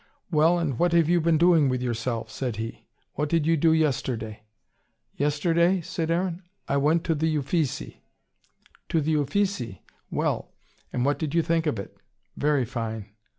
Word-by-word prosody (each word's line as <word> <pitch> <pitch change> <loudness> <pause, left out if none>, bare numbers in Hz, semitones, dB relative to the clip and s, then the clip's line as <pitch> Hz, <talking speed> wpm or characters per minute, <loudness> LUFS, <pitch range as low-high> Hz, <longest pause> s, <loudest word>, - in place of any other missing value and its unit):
"Well, 160 +2 +4
and 150 -8 -1
what 175 -1 +3
have 170 -2 +4
you 175 0 +3
been 165 0 +3
doing 165 -4 +5
with 130 -1 0
yourself?" 115 -1 -2
said 125 -4 -3
he. 115 +2 -6 0.3
"What 150 0 -2
did 165 -2 +2
you 165 +1 +4
do 160 +1 +3
yesterday?" 125 -8 0 0.7
"Yesterday?" 170 +5 +2
said 165 0 -3
Aaron. 175 +1 0 0.3
"I 140 - +1
went 155 +4 +2
to 165 - +1
the 160 0 0
Uffizi." 150 -1 -2 0.9
"To 165 - +2
the 155 +1 +1
Uffizi? 145 - -1 0.3
Well! - - -2 0.4
And 125 0 -1
what 145 +1 +1
did 155 -1 -2
you 165 - +4
think 165 -1 +1
of 130 - 0
it?" 100 - -7 0.4
"Very 145 -3 +1
fine." 110 -4 -5
150 Hz, 165 wpm, -26 LUFS, 125-165 Hz, 0.9 s, doing